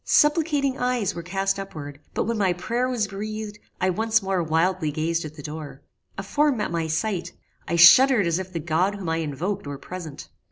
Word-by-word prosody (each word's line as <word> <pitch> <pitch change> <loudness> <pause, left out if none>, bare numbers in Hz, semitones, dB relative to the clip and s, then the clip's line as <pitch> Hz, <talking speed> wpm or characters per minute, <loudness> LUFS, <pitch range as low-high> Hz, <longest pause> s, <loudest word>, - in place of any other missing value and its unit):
Supplicating 295 -3 +2
eyes 250 -5 0
were 170 - -6
cast 195 +3 -1
upward, 145 -7 -7 0.2
but - - +1
when 230 -1 -2
my 190 -3 +2
prayer 235 +8 -1
was 240 -4 0
breathed, 210 +1 -6 0.2
I 185 0 +2
once 225 +4 +2
more 190 -2 0
wildly 165 0 +1
gazed 165 +2 -1
at 155 0 -8
the 145 - -10
door. 150 -2 -8 0.3
A 195 - -4
form 290 +6 +1
met 210 - -2
my 165 -1 -1
sight: 175 +3 -2 0.3
I - - 0
shuddered 210 +6 +7
as 170 +1 +1
if 190 0 -6
the 170 - -3
God 175 +5 0
whom 190 -5 -5
I 165 - 0
invoked 165 +4 -3
were 145 -1 -5
present. 170 -2 -8
185 Hz, 200 wpm, -24 LUFS, 165-215 Hz, 0.3 s, shuddered